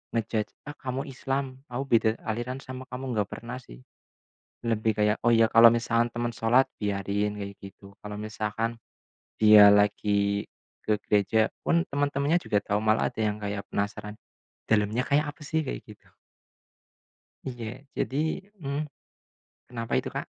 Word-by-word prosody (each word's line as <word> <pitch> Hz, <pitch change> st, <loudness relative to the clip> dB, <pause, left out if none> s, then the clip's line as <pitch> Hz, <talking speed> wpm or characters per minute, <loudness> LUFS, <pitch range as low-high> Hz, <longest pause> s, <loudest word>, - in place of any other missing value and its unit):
nge-judge, 110 Hz, -2 st, -1 dB, 0.2 s
"Ah 145 Hz, -, -6 dB
kamu 130 Hz, +1 st, -4 dB
Islam, 135 Hz, 0 st, -3 dB
aku 125 Hz, +3 st, -2 dB
beda 115 Hz, -3 st, +3 dB, 0.2 s
aliran 120 Hz, +3 st, -3 dB
sama 130 Hz, 0 st, -7 dB
kamu." 125 Hz, +1 st, -6 dB
Nggak 105 Hz, -1 st, 0 dB
pernah 120 Hz, +2 st, -6 dB
sih. -, -, -14 dB, 0.9 s
Lebih 110 Hz, -1 st, +1 dB
kayak, 105 Hz, 0 st, +3 dB
"Oh -, -, +6 dB
ya 115 Hz, 0 st, +5 dB
kalau 115 Hz, 0 st, +9 dB
misalkan 115 Hz, 0 st, +1 dB
teman 120 Hz, 0 st, -2 dB
sholat, 120 Hz, +5 st, +3 dB, 0.2 s
biarin." 100 Hz, +1 st, -1 dB
Kayak 100 Hz, 0 st, -6 dB
gitu. 100 Hz, 0 st, -12 dB
Kalau 105 Hz, 0 st, -6 dB
misalkan, 110 Hz, +2 st, -3 dB, 0.7 s
dia 105 Hz, -1 st, +9 dB
lagi 100 Hz, 0 st, +2 dB, 0.4 s
ke 105 Hz, -1 st, +2 dB
gereja 105 Hz, +2 st, +2 dB
pun 170 Hz, +1 st, +2 dB
teman-temannya 145 Hz, +3 st, +1 dB
juga 105 Hz, -, +1 dB
tau, 105 Hz, +1 st, 0 dB
malah 110 Hz, 0 st, +2 dB
ada -, -, -6 dB
yang 105 Hz, -1 st, 0 dB
kayak 100 Hz, -1 st, -3 dB
penasaran, 105 Hz, +1 st, -3 dB, 0.5 s
"Dalamnya 110 Hz, +3 st, +2 dB
kayak 150 Hz, +2 st, +3 dB
apa 150 Hz, -, -25 dB
sih?" 160 Hz, 0 st, 0 dB
Kayak 130 Hz, -, -5 dB
gitu. 105 Hz, -, -16 dB, 1.3 s
Iya, 120 Hz, -3 st, -5 dB, 0.3 s
jadi 135 Hz, -, -1 dB, 0.5 s
mhm. 140 Hz, 0 st, -2 dB, 0.9 s
Kenapa 115 Hz, -1 st, -6 dB
itu, -, -, -3 dB
Kak? -, -, -2 dB
115 Hz, 145 wpm, -27 LUFS, 105-130 Hz, 1.3 s, kalau